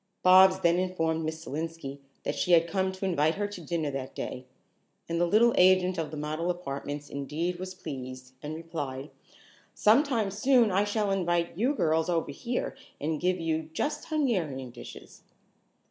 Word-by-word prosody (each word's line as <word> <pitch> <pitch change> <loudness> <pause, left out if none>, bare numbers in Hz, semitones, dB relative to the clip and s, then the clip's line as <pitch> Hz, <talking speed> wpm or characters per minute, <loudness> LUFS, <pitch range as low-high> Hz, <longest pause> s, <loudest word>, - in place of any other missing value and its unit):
Bobs 185 +1 +7
then 170 0 +3
informed 165 -3 0
Miss 160 +1 -4
Selenski 155 -2 -5 0.2
that - - -1
she 180 - +1
had 165 0 +6
come 190 +1 0
to 190 +1 -5
invite 160 -3 +2
her 205 - -1
to 205 -3 -8
dinner 160 -2 -2
that 135 -1 -5
day, 125 0 -5 0.6
and 170 0 -1
the 175 - +3
little 230 +5 +5
agent 185 -1 +4
of 160 -2 -2
the 155 - -7
model 155 +3 -2
apartments 145 -4 -4
indeed 155 +6 -3
was 185 0 -6
pleased, 130 -6 -8
and 150 +1 -5
replied: 145 -4 -5 0.6
"Some 220 +6 +5
time 235 -9 -1
soon 235 +1 +3
I 195 +2 +2
shall 205 -1 0
invite 175 -3 0
you 250 - +1
girls 160 - +1
over 165 -4 0
here 240 - -3 0.2
and 155 +1 -2
give 180 +1 +1
you 160 -1 -2
just 295 - -2
Hungarian 180 - -1
dishes." 120 - -12
170 Hz, 170 wpm, -28 LUFS, 150-190 Hz, 0.6 s, Bobs